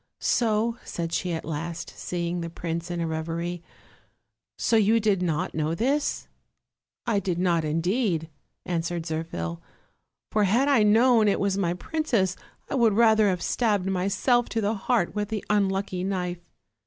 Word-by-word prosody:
"So," 230 0 +1
said 170 -1 -4
she 180 - -1
at 165 - -3
last, 165 +1 -5
seeing 175 0 -3
the 170 - -4
prince 170 0 -4
in 175 -1 -3
a 170 - 0
reverie 165 +2 -3 1.0
"so 230 - +1
you 220 +1 +4
did 205 -4 +1
not 175 +1 -1
know 155 +1 -1
this?" 275 - 0 0.8
"I 225 -4 +2
did 180 -3 -2
not, 175 -2 +2
indeed," 165 +2 0 0.4
answered 170 -1 -2
Zirphil; 120 - -4 0.7
"for 210 -1 +3
had 235 +8 +3
I 275 -6 +4
known 225 +1 +5
it 200 - +2
was 200 -1 +1
my 175 -3 0
princess 220 - 0 0.3
I - - -5
would 235 -5 +4
rather 220 -1 +5
have 180 -2 -1
stabbed 210 -6 +1
myself 200 +6 +1
to 225 - -1
the 210 0 +1
heart 215 -2 0
with 210 0 -2
the 215 -2 -3
unlucky 195 -2 0
knife." 180 -2 -3
190 Hz, 155 wpm, -26 LUFS, 170-220 Hz, 1.0 s, known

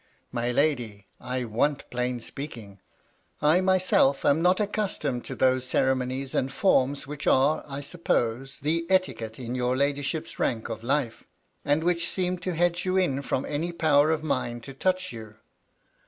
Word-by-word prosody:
" - - -41
My 120 -1 -1
lady, 120 -8 0
I 125 0 -3
want 130 +6 0
plain 125 0 -1
speaking. 115 -6 -8 0.6
I 155 +5 +4
myself 185 -7 +3
am 145 +3 +4
not 180 +2 +3
accustomed 195 - -2
to - - -5
those 130 -1 +2
ceremonies 130 +1 0
and 130 - 0
forms 140 -7 +2
which 150 +1 -6
arcy 140 +4 +3
I 140 +1 -4
suppose, 135 -5 -1
the 165 +3 0
etiquette 130 -12 0
m 120 -1 -5
your 125 0 0
ladyship's 145 +3 -1
rank 115 -1 -1
of 115 - -5
life, 125 -1 -1 0.4
and 145 +3 +1
which 170 -1 +1
seem 180 -1 -1
to 180 +1 -3
hedge 175 +1 +1
you 185 0 0
in 140 -8 +1
from 135 -1 -2
any 160 +4 -2
power 155 -3 +3
of 160 -1 0
mine 130 -5 -1
to 135 +3 -9
touch 185 +5 -1
you. 110 -2 -9
140 Hz, 165 wpm, -26 LUFS, 125-170 Hz, 0.6 s, I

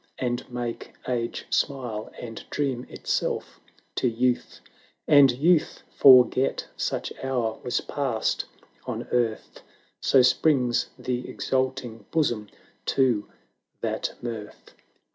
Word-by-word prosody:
And 125 0 -3
make 120 -1 -5
Age 120 -2 -2
smile, 120 -6 -1
and 115 -2 -7
dream 130 -4 -2
itself - - -2 0.4
to - - +2
youth, 125 +2 0 0.5
And 145 -3 +7
Youth 155 +6 +2
forget 130 0 +6
such - - -2
hour 120 -4 -1
was 125 -1 0
passed 130 -6 -1 0.4
on - - -3
earth. 115 -3 -1 0.4
So 130 - +5
springs 125 -1 +3
the 125 0 -3
exulting 130 -5 -2
bosom 120 -10 0 0.4
to 125 -6 +2 0.5
that - - -2
mirth 110 -3 -7
125 Hz, 105 wpm, -26 LUFS, 115-135 Hz, 0.5 s, And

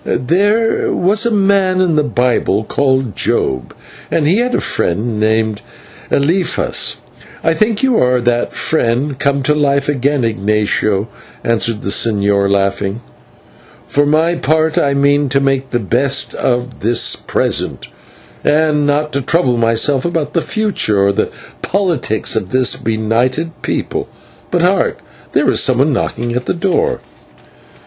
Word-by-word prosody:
"There 205 - +1
was 210 +6 +2
a - - 0
man 195 -2 +2
in 180 -4 +2
the 150 - +3
Bible 125 -6 0
called 130 -2 0
Job, 65 -2 0 0.4
and 155 - 0
he 175 +7 +3
had 250 +1 0
a - - +1
friend 105 +5 -1
named 110 -1 0 0.5
Eliphaz 170 +6 +1 0.5
I 165 - +2
think 215 +5 0
you 260 -3 +3
are 125 0 +2
that 120 0 0
friend 135 -1 -1
come 140 -1 0
to 150 - +2
life 140 -2 +1
again, 140 -1 0
Ignatio," 105 -1 0 0.4
answered 115 -1 0
the - - -3
señor, 100 -3 +2
laughing. 100 +2 -1 0.8
"For 145 0 +1
my 160 +3 +2
part, 160 0 0
I 140 -1 +1
mean 140 0 +2
to 135 +2 +2
make 135 -1 0
the 120 - 0
best 130 +6 0
of 125 0 -2
the 115 +2 +1 0.3
present, - - -1 0.6
and 150 -1 +2
not 150 +1 0
to 140 - -1
trouble 130 -3 +1
myself 115 +4 +2
about 160 -3 -2
the 170 - +1
future 180 - 0
or 100 - +2
the - - -1 0.3
politics 170 - 0
of 100 -4 -2
this 130 +2 +2
benighted 115 +8 -1
people. - - -3 0.4
But 175 -1 0
hark, 185 0 +1 0.4
there - - +2
is - - +2
someone 135 +3 +2
knocking 120 -1 -2
at 125 +1 -3
the - - 0
door." 195 - 0
135 Hz, 145 wpm, -15 LUFS, 115-160 Hz, 0.8 s, the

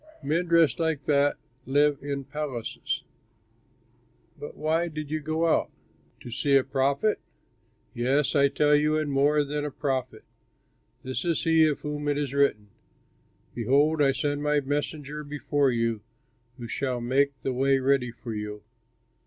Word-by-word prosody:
Men 165 +5 0
dressed 170 -2 +4
like 160 -4 -1
that 145 -1 +2 0.3
live 145 +1 +3
in 140 0 -4
palaces. 140 -4 -4 1.3
But 145 - -9
why 160 +3 0
did 155 -2 -6
you 155 - 0
go 155 +2 -1
out? 165 - +2 0.5
To 120 - -9
see 140 +3 +3
a 135 - +2
prophet? 140 +9 +1 0.7
Yes, 130 +4 +1
I 140 -1 +5
tell 150 +1 +3
you, 150 +1 +2
and 155 -2 -1
more 145 +2 +3
than 145 +1 -3
a 150 - -2
prophet! 130 -5 -3 0.8
This 130 0 -3
is 170 -2 0
he 160 -1 +5
of 150 - -2
whom 150 0 -4
it 145 -1 +1
is 145 -2 -2
written: 125 -7 +1 0.8
"'Behold, 145 +6 +2
I 140 -1 +5
send 145 +2 -2
my 150 0 +2
messenger 145 +1 -3
before 145 -1 0
you, 115 -3 0 0.6
Who 120 -2 -7
shall 130 +1 -2
make 135 +3 +1
the 135 - -1
way 135 +2 +3
ready 130 -1 +1
for 115 -1 -8
you.' 105 -1 -6
145 Hz, 155 wpm, -26 LUFS, 130-150 Hz, 1.3 s, I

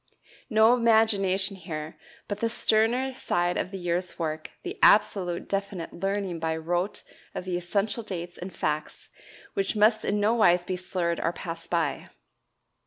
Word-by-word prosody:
No 220 0 +6
imagination 215 -5 +3
here, 160 -4 -6 0.3
but 205 0 -4
the 230 - +1
sterner 235 +3 +2
side 175 -7 0
of - - -1
the 195 - -6
year's 175 0 -2
work 155 -2 -3
the - - -6
absolute 190 -4 +4
definite 195 -3 -3
learning 195 -2 -2
by 160 0 -1
rote 175 +4 -2 0.3
of - - -4
the 185 -1 -2
essential 200 +6 -1
dates 175 -5 -6
and 180 +2 -6
facts 155 -2 -3 0.4
which 195 +2 -1
must 215 +1 +4
in 205 - 0
no 210 +2 +3
wise 180 -6 +4
be 185 - -2
slurred 180 -2 -2
or 165 - +1
passed 165 -2 -7
by. 170 -2 -1
185 Hz, 155 wpm, -27 LUFS, 175-210 Hz, 0.4 s, No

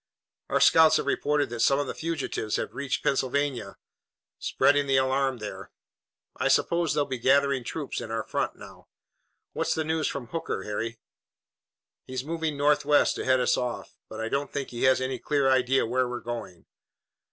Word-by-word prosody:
"Our - - +2
scouts 160 -1 +6
have - - -2
reported 145 -1 0
that 120 - -5
some 135 +4 +4
of 145 - 0
the - - -4
fugitives 155 -9 -3
have - - -3
reached 140 -1 -3
Pennsylvania, 135 -5 -1 0.6
spreading 145 0 +2
the 135 -1 +3
alarm 130 0 +1
there. 105 -2 -7 0.7
I - - 0
suppose 170 -1 +2
they'll 145 - +2
be 130 -3 -4
gathering 140 +1 +3
troops 145 +4 -4
in - - -7
our 115 0 -2
front - - -2
now. - - -14 0.7
What's - - 0
the 160 - 0
news 160 0 0
from 140 -3 -4
Hooker, 165 -12 -3
Harry?" 110 +2 -4 1.1
"He's 130 0 -4
moving 160 -2 -2
northwest 145 0 +3
to - - -4
head 130 0 +3
us - - +2
off, 125 -1 -4
but 110 - -8
I 110 - -2
don't 140 +4 -2
think 140 -2 -4
he 120 +1 -1
has 130 0 +4
any 130 -1 -2
clear 145 0 +1
idea 130 0 +3
where 125 +2 0
we're 125 0 -4
going." 115 -7 -7
135 Hz, 175 wpm, -27 LUFS, 125-145 Hz, 1.1 s, scouts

